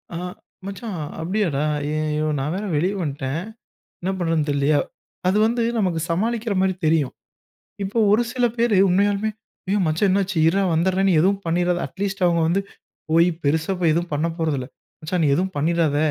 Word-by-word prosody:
ஆ! - - -2 0.5
மச்சான் 200 +1 -6 0.3
அப்பிடியாடா, 170 -5 0 0.2
ஐய்யயோ! 155 0 -1
நான் 150 +5 -2
வேற 200 - -3
வெளியே 180 +7 +1
வந்ட்டேன். 140 0 -3 0.6
என்ன 185 - -1
பண்றது 165 -3 +1
தெரியலயே! 145 +1 +2 0.5
அது 195 - +3
வந்து 235 +1 0 0.2
நமக்கு 180 -5 0
சமாளிக்கிறமாரி 200 0 0
தெரியும். 155 -4 +2 0.7
இப்போ 200 +4 -1
ஒரு 220 +3 +4
சில 250 -1 +2
பேர் 230 -2 +2
உண்மையாலுமே, 205 +3 +2 0.4
ஐயோ! 205 +1 +2
மச்சான் 165 +6 +2
என்னாச்சு, 190 -2 0
இருடா! 195 +4 +2
வந்துர்றேன்னு 190 +4 +2
நீ 170 - +3
எதுவும் 195 +3 +2
பண்ணிறாத! 175 +1 +1
அட்லீஸ்ட் 195 -1 -3
அவுங்க 170 -1 +2
வந்து 180 +4 +1 0.5
போய் 165 +2 +5 0.2
பெருசா 160 +5 +1
போய் 170 -3 +3
எதுவும் 170 +1 -1
பண்ண 150 +3 0
போறதில்ல, 145 -6 -1 0.3
மச்சான் 165 +2 -1
நீ - - +3
எதுவும் 190 +4 -1
பண்ணிறாத! 160 -1 +1
175 Hz, 155 wpm, -22 LUFS, 155-195 Hz, 0.7 s, போய்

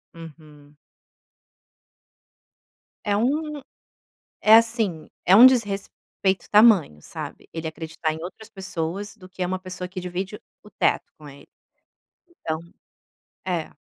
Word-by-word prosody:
Uhum. 150 -3 -14 2.3
É 205 - +2
um 290 +6 -1 0.8
é 220 +1 +8
assim, 225 -8 +1 0.2
é 190 +3 +6
um 245 +3 +11
desrespeito 200 -4 0
tamanho, 205 - +5
sabe, - - -9
ele 160 -1 -4
acreditar 160 0 -4
em 160 - -7
outras 215 +5 -9
pessoas 190 +1 -5
do 185 -3 -14
que 185 - -16
é 180 - +1
uma 185 +1 -3
pessoa 185 -1 -6
que 185 +1 -7
divide 180 +3 -4 0.3
o 210 - -13
teto - - +1
com 150 -1 -13
ele. 140 +1 -14 0.9
Então 160 - -4 0.9
É. 175 -4 -2
185 Hz, 120 wpm, -24 LUFS, 160-210 Hz, 2.3 s, um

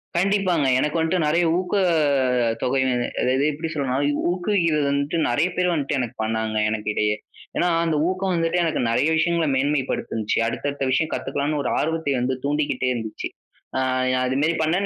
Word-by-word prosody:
கண்டிப்பாங்க. 180 -5 +2
எனக்கு 150 +4 0
வந்துட்டு 160 0 +1
நிறைய 170 +3 +2
ஊக்கத் 185 +1 +1 0.7
தொகை 130 +1 +1 0.4
அதாவது, 130 +2 +2
எப்பிடி 160 +3 -5
சொல்றன்னா, 135 -3 -1 0.3
ஊக்குவிக்கிறது 175 -5 +1
வந்துட்டு 140 +4 -1
நிறைய 145 +9 +2
பேர் 180 -1 +1
வந்துட்டு 145 -2 -1
எனக்கு 120 0 -3
பண்ணாங்க 110 0 -1
எனக்கு 110 -1 -3
இடையே. 105 0 +1 0.4
ஏன்னா, 175 - +2 0.2
அந்த 160 -2 +1
ஊக்கம் 185 0 -1
வந்துட்டு 165 +1 +1
எனக்கு 165 -5 0
நிறைய 140 - +2
விஷயங்களை 165 -1 +1
மேன்மை 140 +1 +1
படுத்துனுச்சு, 110 -1 -2
அடுத்த 145 - -2
அடுத்த 140 -1 -3
விஷயம் 155 +4 +1
கத்துக்கலான்னு 145 +1 -2
ஒரு - - -1
ஆர்வத்தை 160 -2 -1
வந்து 130 +1 0
தூண்டிக்கிட்டே 145 -3 0
இருந்துச்சு. 110 -2 -5 0.5
அ - - +1 0.5
அதுமாரி 140 +6 +1
பண்ணேன், 175 +6 +1
150 Hz, 160 wpm, -23 LUFS, 130-170 Hz, 0.7 s, கண்டிப்பாங்க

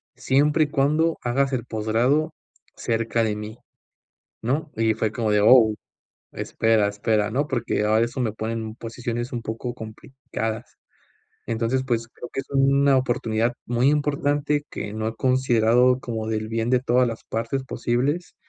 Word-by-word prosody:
siempre 150 +3 +2
y - - -6
cuando 155 +4 +2
hagas 135 +3 +1
el 120 -1 -2
posgrado 120 +9 +1 0.4
cerca 115 0 0
de 105 -1 0
mí", 105 +2 -7 0.9
¿no? 145 +6 -1
Y 110 -1 +2
fue 110 -1 -1
como 110 -3 -1
de, 105 - +4
oh, 110 -3 +7 0.6
espera, 110 -2 +1
espera, 105 +1 0
¿no?, 140 +5 0
porque 120 -4 -1
ahora 110 +2 +3
eso 125 +2 -5
me 110 -4 0
ponen 110 0 -4
posiciones 120 +1 -5
un 120 -1 -3
poco 115 +2 -5
complicadas. 110 -1 -6 0.7
Entonces, 115 +3 0
pues, 115 -3 -1
creo 125 - -10
que 135 - -3
es - - -18
una 140 0 +4
oportunidad 120 -2 0
muy 120 +3 +2
importante 145 0 0
que 105 - -6
no 110 0 -2
he 115 - -4
considerado 125 -1 +3
como 110 -2 -4
del 110 0 -2
bien 115 +1 -1
de 125 -1 +4
todas 125 0 +3
las 115 -1 -5
partes 115 +4 -3
posibles, 130 +7 -1
120 Hz, 155 wpm, -24 LUFS, 110-135 Hz, 0.9 s, oh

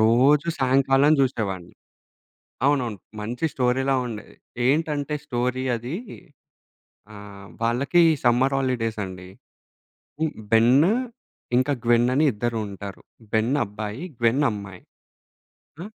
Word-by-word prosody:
రోజు 130 +8 +4
సాయంకాలం 135 +2 +3
చూసేవాడిని. 100 -9 -2 0.9
అవునవును. 130 -7 +1 0.2
మంచి 120 +7 -3
స్టోరీ‌లా 135 +2 +1
ఉండేది. 110 -3 -8 0.3
ఏంటంటే 150 0 0
స్టోరీ 125 +1 -1
అది. 120 +7 -5 1.2
ఆహ్, 100 -1 -11
వాళ్ళకి 130 +9 +2 0.2
సమ్మర్ 125 +3 +3
హాలిడేస్ 120 -5 -1
అండి. 90 -1 -9 1.2
బెన్ 125 +9 +5 0.7
ఇంకా 130 +3 +2
గ్వెన్ 120 +1 +4
అని 150 +4 +3
ఇద్దరు 115 +2 -2
ఉంటారు. 100 0 -8 0.3
బెన్ 110 +4 +2
అబ్బాయి, 105 - -6 0.2
గ్వెన్ 120 +5 +2
అమ్మాయి. 100 -3 -8 1.0
ఆ! - - -6
120 Hz, 100 wpm, -24 LUFS, 110-135 Hz, 1.2 s, బెన్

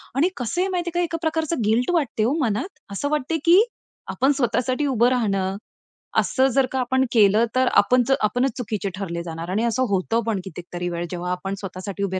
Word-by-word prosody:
आणि 315 +7 +3
कसं 255 +8 -2
आहे 380 - +1
माहिती 355 -2 -1
आहे 350 +1 -2
का? - - +2
एका 330 0 -3
प्रकारचं 320 -3 -1
गिल्ट 235 +7 +2
वाटते 275 -10 0
हो 245 - +2
मनात. 220 - 0 0.2
असं 240 +9 -2
वाटते, 300 +2 0
की 350 +4 +7 0.5
आपण 270 +2 +2
स्वतःसाठी 255 +3 0
उभं 245 -2 +3
राहणं 195 -6 0 0.6
असं 265 0 +2
जर 270 -1 +4
का 265 - -1
आपण 260 +1 +1
केलं, 215 +1 +5
तर 255 0 +3
आपण 245 +5 +4 0.2
आपणच 245 +5 +1
चुकीचे 210 -5 -3
ठरले 170 -4 -4
जाणार. 165 0 -6
आणि 205 +5 0
असं 235 +2 +1
होतं 200 +4 +1
पण 215 -4 0
कितीतरी 175 0 -6
वेळ 170 0 -3
जेव्हा 180 0 -3
आपण 195 +2 -3
स्वतःसाठी 195 +1 -5
उभे 190 -1 -1
230 Hz, 195 wpm, -23 LUFS, 195-270 Hz, 0.6 s, की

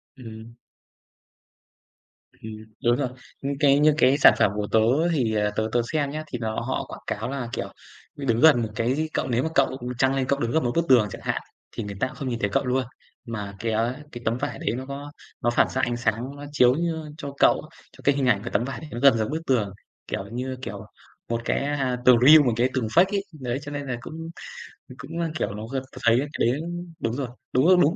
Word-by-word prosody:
Ừm. 115 -2 -11 1.9
Ừm, 110 - -7 0.3
đúng 120 0 +4
rồi. 130 -1 -1 0.3
Những 140 0 -2
cái 140 -2 +5
những 150 0 +5
cái 135 0 +4
sản 145 - +8
phẩm 100 - +4
của 105 0 -2
tớ 110 - +5 0.3
thì, 125 -9 +1
ờ, 105 -1 +1
tớ 110 - 0
tớ 120 - +2
xem 150 -3 0
nhá, 155 +1 -4
thì 125 - -5
nó 110 -1 -2
họ 125 +3 -2
quảng - - -9
cáo - - -3
là, 135 -3 -3
kiểu, - - -4 0.4
đứng 125 -5 0
gần 150 -5 +6
một 110 - -2
cái 120 +4 +1
gì 155 +2 -1
cậu - - -1
nếu 120 +1 +1
mà 160 - -1
cậu, 135 - +5
ừm, 130 -2 -6
chăng 130 +1 +2
lên 135 -1 0
cậu 140 +1 +1
đứng 120 -2 -1
gần 160 - +2
một 120 - 0
bức 170 0 +2
tường 120 -5 +6
chẳng - - -8
hạn, - - -1 0.3
thì 115 - -5
người 100 -1 -6
ta 130 - +1
không 135 0 -5
nhìn 120 -2 -3
thấy 100 - 0
cậu 100 - 0
luôn. 130 +1 +1 0.4
Mà 105 -4 -5
cái, 115 0 -1
á, 115 +4 0
cái 120 - -8
tấm 115 +2 +1
vải 145 +3 -4
đấy - - -1
nó 130 - -5
có 140 +1 -7 0.3
nó 120 - +2
phản 120 - +3
xạ 130 - -1
ánh 120 0 0
sáng, 120 +3 -2
nó 145 0 -9
chiếu 125 -4 +5
như 160 -2 -2
cho 140 -3 -6
cậu - - +5 0.3
cho - - -16
cái 140 - +3
hình 140 -2 0
ảnh 105 -5 +2
của - - -4
tấm 115 - +2
vải 135 +2 -5
đấy 155 - -9
nó 120 - -4
gần 135 -2 +6
giống 110 -1 -1
bức 160 +3 -2
tường, 110 -7 +1 0.3
kiểu 95 - -3
như, 130 +2 -3
kiểu, 105 -4 -6 0.4
một 115 0 -1
cái, - - +1
à, 135 -3 -1
tường 125 -1 +8
real 155 +1 +10
một 120 - +2
cái 120 +3 +2
tường 125 -4 0
fake 170 +12 +5
ấy. 200 - 0 0.2
Đấy, 125 +1 -2
cho 145 - -8
nên 145 -1 -5
là 130 - -2
cũng - - -9 0.8
thì 130 - -10
cũng 165 +6 -7
là, 165 -1 0
kiểu, 105 - -1
nó 105 +1 -6
gần 135 +1 -3
tớ - - -14
thấy 115 +1 +5
á - - -2
cái - - +1
đấy 125 +4 +1 0.4
đúng 115 - -1
rồi, 135 0 -2 0.3
đúng 130 +3 +3
rồi, 185 +1 +6
đúng 160 +4 +3
130 Hz, 255 wpm, -25 LUFS, 115-140 Hz, 1.9 s, real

